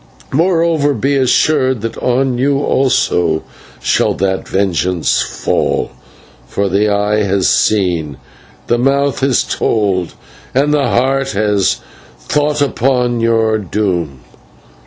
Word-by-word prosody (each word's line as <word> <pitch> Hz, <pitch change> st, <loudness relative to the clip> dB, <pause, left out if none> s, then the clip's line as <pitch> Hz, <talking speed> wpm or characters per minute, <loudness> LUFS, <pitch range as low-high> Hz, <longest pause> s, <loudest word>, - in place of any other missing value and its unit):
Moreover, 165 Hz, -2 st, +1 dB
be 135 Hz, +6 st, 0 dB
assured 130 Hz, -1 st, +2 dB
that 115 Hz, 0 st, -4 dB
on 125 Hz, 0 st, 0 dB
you 140 Hz, +2 st, +2 dB
also 90 Hz, -, +1 dB, 0.4 s
shall -, -, +1 dB
that 95 Hz, 0 st, -2 dB
vengeance 90 Hz, -3 st, 0 dB
fall, -, -, -1 dB, 0.6 s
for 100 Hz, -, -1 dB
the 100 Hz, +3 st, +1 dB
Eye 105 Hz, +1 st, +1 dB
has 100 Hz, -2 st, +1 dB
seen, 85 Hz, -9 st, +1 dB, 0.5 s
the 120 Hz, -, 0 dB
Mouth 140 Hz, +2 st, +1 dB
has 135 Hz, -2 st, +2 dB
told, 95 Hz, -5 st, -1 dB, 0.4 s
and 145 Hz, +3 st, +2 dB
the 145 Hz, -2 st, +1 dB
Heart 135 Hz, +1 st, 0 dB
has 105 Hz, -2 st, +1 dB, 0.5 s
thought 150 Hz, 0 st, +1 dB
upon 125 Hz, -2 st, 0 dB
your 115 Hz, -1 st, +1 dB
doom. 90 Hz, -9 st, -2 dB
115 Hz, 115 wpm, -15 LUFS, 100-135 Hz, 0.6 s, assured